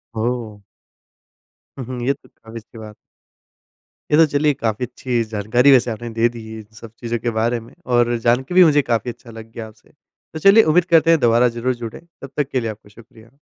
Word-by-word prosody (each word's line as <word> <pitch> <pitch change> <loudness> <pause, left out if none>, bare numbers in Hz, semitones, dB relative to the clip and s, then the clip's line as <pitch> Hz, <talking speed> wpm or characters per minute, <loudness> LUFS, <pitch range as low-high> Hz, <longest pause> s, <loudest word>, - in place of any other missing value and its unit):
ओह! 110 -2 -3 1.2
हुँ, 130 - -6
हुँ। 125 0 -6
ये 135 - +2
तो - - -22
काफ़ी 115 +1 -12
सही 115 +1 -17
बात 110 - -9
है। 105 - -12 1.2
ये 150 - +4
तो 165 - +7
चलिए 145 +1 +2
काफ़ी 115 -3 -2
अच्छी 125 -1 -3
जानकारी 110 +6 +2
वैसे 125 -2 +4
आपने 115 +2 -6
दे 115 +1 +1
दी 115 -2 -10
है 110 0 -8
इन 110 - -12
सब 115 -1 -12
चीज़ों 120 -1 -3
के 120 - -2
बारे 120 +2 0
में 115 - -16 0.2
और 120 0 +2
जान 120 +3 +1
के 140 - -8
भी 185 - +8
मुझे 150 -3 +4
काफ़ी 120 -2 -2
अच्छा 120 0 -15
लग 115 0 -12
गया 115 -1 -8
आपसे। 110 0 -20
तो 155 +1 -15
चलिए 195 +6 +6
उम्मीद 165 +3 +3
करते 165 0 +5
हैं 165 - +4
दोबारा 120 0 +3
ज़रूर 125 +2 -1
जुड़ें। 115 -2 -8 0.2
तब 135 - -9
तक 145 -2 0
के 130 - -1
लिए 115 -2 -3
आपका 105 -1 -15
शुक्रिया। 115 +2 -18
120 Hz, 220 wpm, -19 LUFS, 115-135 Hz, 1.2 s, भी